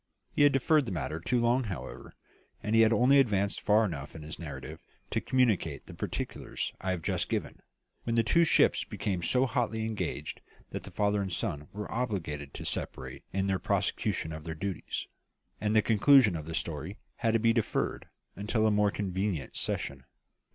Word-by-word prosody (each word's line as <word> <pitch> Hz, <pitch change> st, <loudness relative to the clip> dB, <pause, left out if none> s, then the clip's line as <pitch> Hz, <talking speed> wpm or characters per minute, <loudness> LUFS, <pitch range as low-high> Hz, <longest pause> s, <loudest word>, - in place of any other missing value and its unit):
He -, -, 0 dB
had 145 Hz, 0 st, +7 dB
deferred 140 Hz, +1 st, +3 dB
the -, -, -3 dB
matter 80 Hz, -2 st, -3 dB
too 120 Hz, +9 st, +1 dB
long, 120 Hz, +2 st, +2 dB
however; 100 Hz, -5 st, -7 dB, 0.5 s
and 105 Hz, -, -1 dB
he 115 Hz, -, +6 dB
had 110 Hz, 0 st, +6 dB
only 125 Hz, +5 st, +5 dB
advanced 100 Hz, -6 st, +2 dB
far 105 Hz, +2 st, +4 dB
enough 75 Hz, -7 st, -5 dB
in 80 Hz, -, -8 dB
his 80 Hz, +1 st, -7 dB
narrative 70 Hz, -6 st, -7 dB, 0.3 s
to -, -, 0 dB
communicate 110 Hz, -, +1 dB
the -, -, -10 dB
particulars -, -, -4 dB
I 95 Hz, -, -2 dB
have 90 Hz, -3 st, -1 dB
just -, -, -1 dB
given, -, -, -3 dB, 0.4 s
when 115 Hz, -, -1 dB
the 115 Hz, -, +4 dB
two 170 Hz, +9 st, +4 dB
ships 165 Hz, -, +4 dB
became 95 Hz, -4 st, -3 dB
so 125 Hz, +9 st, +3 dB
hotly 115 Hz, -3 st, -1 dB
engaged 100 Hz, -9 st, -3 dB, 0.3 s
that -, -, -4 dB
the -, -, -9 dB
father 105 Hz, 0 st, +1 dB
and 95 Hz, -1 st, -3 dB
son 85 Hz, -6 st, -2 dB
were 105 Hz, +1 st, -5 dB
obliged 80 Hz, -, -3 dB
to -, -, -7 dB
separate -, -, -4 dB
in 95 Hz, 0 st, 0 dB
the 95 Hz, -1 st, +1 dB
prosecution 80 Hz, -, -1 dB
of 80 Hz, 0 st, -7 dB
their 80 Hz, 0 st, -5 dB
duties, 95 Hz, +3 st, -4 dB, 0.6 s
and 105 Hz, +1 st, +1 dB
the 110 Hz, -, +5 dB
conclusion 115 Hz, -2 st, +6 dB
of 80 Hz, -2 st, -5 dB
the 80 Hz, -, -4 dB
story 80 Hz, +4 st, -4 dB, 0.2 s
had 115 Hz, -2 st, +1 dB
to 115 Hz, -, +4 dB
be 115 Hz, +1 st, +4 dB
deferred 115 Hz, -2 st, -1 dB, 0.3 s
until 110 Hz, +2 st, 0 dB
a 110 Hz, -, +4 dB
more 105 Hz, 0 st, +3 dB
convenient 95 Hz, -7 st, -2 dB
season. -, -, -3 dB
105 Hz, 185 wpm, -30 LUFS, 85-115 Hz, 0.6 s, had